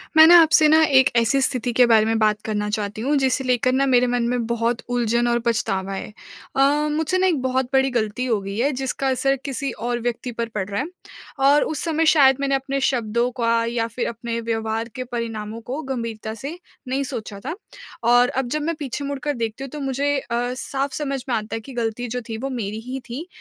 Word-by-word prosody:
मैं 315 Hz, -, +10 dB
ना 345 Hz, +1 st, +9 dB
आपसे 310 Hz, -1 st, +5 dB
ना 315 Hz, +1 st, +6 dB
एक 265 Hz, -4 st, +5 dB
ऐसी 235 Hz, +4 st, +3 dB
स्थिति 250 Hz, -2 st, +1 dB
के 250 Hz, +1 st, +6 dB
बारे 225 Hz, -2 st, +5 dB
में 225 Hz, 0 st, +1 dB
बात 215 Hz, -1 st, +2 dB
करना 210 Hz, -1 st, -2 dB
चाहती 210 Hz, 0 st, -3 dB
हूँ 285 Hz, +5 st, +1 dB
जिसे 265 Hz, 0 st, +1 dB
लेकर 255 Hz, 0 st, +2 dB
ना 270 Hz, +1 st, +2 dB
मेरे 250 Hz, -2 st, +4 dB
मन 245 Hz, -1 st, 0 dB
में 245 Hz, -1 st, -1 dB
बहुत 235 Hz, 0 st, 0 dB
उलझन 240 Hz, 0 st, +1 dB
और 235 Hz, 0 st, +2 dB
पछतावा 195 Hz, -4 st, -1 dB
है। 195 Hz, -, -5 dB, 0.5 s
अ, 270 Hz, -, +2 dB, 0.3 s
मुझसे 320 Hz, +4 st, 0 dB
ना 375 Hz, 0 st, +3 dB
एक 320 Hz, -7 st, +1 dB
बहुत 260 Hz, 0 st, 0 dB
बड़ी 265 Hz, 0 st, +4 dB
ग़लती 235 Hz, +1 st, -1 dB
हो 230 Hz, -4 st, +1 dB
गई 195 Hz, +1 st, -6 dB
है 265 Hz, +5 st, +2 dB
जिसका 270 Hz, 0 st, -2 dB
असर 270 Hz, +1 st, +1 dB
किसी 275 Hz, -1 st, -2 dB
और 240 Hz, +1 st, -3 dB
व्यक्ति 240 Hz, +1 st, -3 dB
पर 230 Hz, 0 st, -4 dB
पड़ 190 Hz, -3 st, -2 dB
रहा 200 Hz, 0 st, -1 dB
है। 290 Hz, -, -4 dB, 0.6 s
और 290 Hz, +1 st, +5 dB
उस, 310 Hz, -, -3 dB
समय 325 Hz, -1 st, +1 dB
शायद 275 Hz, -4 st, +6 dB
मैंने 275 Hz, -1 st, +1 dB
अपने 270 Hz, +1 st, -2 dB
शब्दों 235 Hz, -2 st, +1 dB
का 230 Hz, 0 st, +2 dB
या 230 Hz, -1 st, -1 dB
फिर 235 Hz, +2 st, -3 dB
अपने 230 Hz, 0 st, -4 dB
व्यवहार 225 Hz, 0 st, -2 dB
के 255 Hz, -, -3 dB
परिणामों 230 Hz, -2 st, -5 dB
को 260 Hz, +6 st, -5 dB
गंभीरता 230 Hz, -5 st, -4 dB
से 280 Hz, +9 st, -7 dB, 0.3 s
नहीं 265 Hz, +2 st, -1 dB
सोचा 225 Hz, -6 st, -6 dB
था। 315 Hz, -, -3 dB, 0.5 s
और 245 Hz, +1 st, +5 dB
अब 265 Hz, -1 st, -2 dB
जब 305 Hz, +3 st, -1 dB
मैं 330 Hz, +2 st, -1 dB
पीछे 285 Hz, 0 st, -4 dB
मुड़कर 280 Hz, +1 st, -2 dB
देखती 230 Hz, +1 st, -4 dB
हूँ 275 Hz, -, -6 dB
तो 300 Hz, -, -6 dB
मुझे 280 Hz, +1 st, 0 dB
अ, 245 Hz, 0 st, -2 dB
साफ़ 270 Hz, +2 st, -3 dB
समझ 275 Hz, -3 st, -3 dB
में 240 Hz, -, +1 dB
आता 215 Hz, 0 st, -3 dB
है -, -, -3 dB
कि 270 Hz, -, -11 dB
ग़लती 235 Hz, 0 st, -2 dB
जो 245 Hz, +2 st, -3 dB
थी 225 Hz, -, -3 dB
वो 270 Hz, +4 st, -4 dB
मेरी 220 Hz, -4 st, -4 dB
ही 260 Hz, +1 st, -4 dB
थी। 285 Hz, +9 st, -6 dB
245 Hz, 225 wpm, -22 LUFS, 230-275 Hz, 0.6 s, मैं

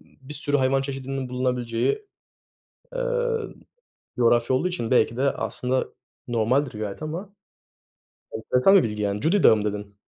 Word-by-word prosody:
Bir 135 Hz, +2 st, -12 dB
sürü 145 Hz, -1 st, 0 dB
hayvan 135 Hz, 0 st, +2 dB
çeşidinin 135 Hz, -1 st, -4 dB
bulunabileceği, 125 Hz, -, -1 dB, 0.9 s
eee, -, -, -3 dB, 1.2 s
coğrafya 120 Hz, +1 st, +3 dB
olduğu 180 Hz, -, 0 dB
için 175 Hz, -11 st, -4 dB
belki 125 Hz, -2 st, +3 dB
de 130 Hz, -, -1 dB
aslında 130 Hz, 0 st, -2 dB, 0.4 s
normaldir 120 Hz, +2 st, +1 dB
gayet 105 Hz, +4 st, -5 dB
ama 175 Hz, +6 st, -6 dB, 1.0 s
enteresan 125 Hz, -, +3 dB
bir 190 Hz, -, +6 dB
bilgi 105 Hz, -1 st, -3 dB
yani. 100 Hz, 0 st, -1 dB
Cudi 180 Hz, -, +2 dB
Dağı 110 Hz, -, +7 dB
mı 105 Hz, -, -2 dB
dedin? 105 Hz, -1 st, -4 dB
130 Hz, 135 wpm, -24 LUFS, 115-145 Hz, 1.2 s, Dağı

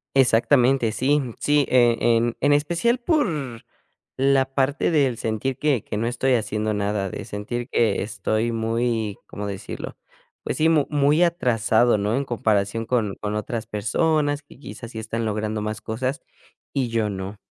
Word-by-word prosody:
Exactamente. 125 Hz, -1 st, +4 dB
Sí, 140 Hz, +6 st, +2 dB, 0.2 s
sí, 145 Hz, -1 st, +3 dB
e 120 Hz, -2 st, +4 dB, 0.2 s
en 120 Hz, 0 st, 0 dB
en 145 Hz, +1 st, +4 dB
especial 170 Hz, +11 st, +1 dB
por 300 Hz, -, +2 dB, 0.9 s
la 135 Hz, 0 st, +4 dB
parte 140 Hz, +5 st, +1 dB
del 140 Hz, -6 st, +2 dB
sentir 115 Hz, +4 st, -2 dB
que 145 Hz, -7 st, +1 dB
que -, -, -5 dB
no 115 Hz, +2 st, -1 dB
estoy 125 Hz, +2 st, +1 dB
haciendo 110 Hz, -1 st, -1 dB
nada, 100 Hz, -1 st, -1 dB
de -, -, -6 dB
sentir 120 Hz, +5 st, -5 dB
que 110 Hz, -5 st, +2 dB
estoy 110 Hz, +2 st, -1 dB
muy, 115 Hz, -2 st, -1 dB
¿cómo 105 Hz, 0 st, -6 dB
decirlo?, 100 Hz, -1 st, -6 dB, 0.5 s
pues, -, -, -3 dB
sí, 160 Hz, +1 st, +3 dB
mu 150 Hz, -4 st, +3 dB
muy 145 Hz, +3 st, +3 dB
atrasado, 120 Hz, -8 st, +3 dB
¿no?, 105 Hz, +3 st, 0 dB
en 140 Hz, -, 0 dB
comparación 110 Hz, -2 st, 0 dB
con 110 Hz, -5 st, -1 dB
con 105 Hz, 0 st, -4 dB
otras 110 Hz, +1 st, -3 dB
personas 145 Hz, +8 st, 0 dB
que 145 Hz, -, -18 dB
quizás 120 Hz, -4 st, -9 dB
sí 110 Hz, -, -8 dB
están 115 Hz, +1 st, -3 dB
logrando 105 Hz, 0 st, -2 dB
más 110 Hz, 0 st, -4 dB
cosas 130 Hz, +6 st, -3 dB, 0.5 s
y 130 Hz, -3 st, 0 dB
yo 115 Hz, -2 st, 0 dB
no. 95 Hz, +1 st, -6 dB
115 Hz, 160 wpm, -23 LUFS, 110-140 Hz, 0.9 s, Exactamente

